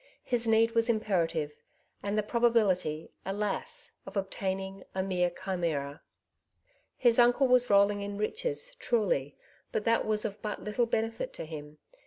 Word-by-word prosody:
His 240 -2 0
need 225 +1 +4
ivas 230 0 +2
imperative, 170 -9 +1 0.5
and 205 +1 -2
the 215 - +2
probability, 210 -9 +2
alas 200 +1 -3
1 - - -6
of - - -5
obtain 190 0 -1
ing, 195 0 -7
a 190 - 0
mere 180 -2 +1
chimera. 170 -6 -3 1.0
His 240 -1 +4
uncle 245 +3 +5
was 250 -1 +4
rolling 200 0 +4
in 200 0 -4
riches, 460 - -2
truly, 205 - 0 0.3
but 210 - -2
that 230 0 +3
was 215 -1 0
of 205 -1 -4
but 210 -1 -4
little 220 +3 0
benefit 225 - -2
to - - -6
him. 150 -1 -8
205 Hz, 155 wpm, -30 LUFS, 185-230 Hz, 1.0 s, uncle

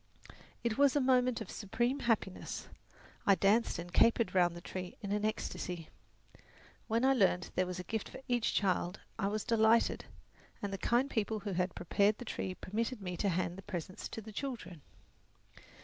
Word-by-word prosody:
It 235 +1 0
was 280 -1 +5
a - - +5
moment 255 -2 +3
of - - -6
supreme 240 +6 -1
happiness. 225 -7 -1 0.6
I 200 - +7
danced 210 +5 +3
and 175 +1 -7
capered 230 -4 +4
round 175 -2 +3
the - - -6
tree 180 +1 -6
in 200 - -3
an 210 0 0
ecstasy. 180 -6 -3 1.0
When 230 +2 +2
I 270 - +6
learned 190 -7 +3
that - - -11
there 185 0 +2
was 180 0 -4
a 180 - -4
gift 220 +3 -3
for - - -9
each 240 -2 +1
child, 185 -1 +1 0.2
I 195 - +1
was 210 +1 -1
delighted, 230 -1 +3 0.5
and 200 -1 -3
the 195 - -3
kind 245 +3 +2
people 220 -4 -1
who 200 0 -3
had 180 0 0
prepared 200 +4 +2
the 245 - -8
tree 185 -4 -3
permitted 230 +6 -2
me 180 -3 -4
to 200 - +1
hand 175 0 -1
the - - -7
presents 185 -2 -5
to 225 - -6
the 220 +1 -10
children. 200 - -5
205 Hz, 185 wpm, -34 LUFS, 185-230 Hz, 1.0 s, I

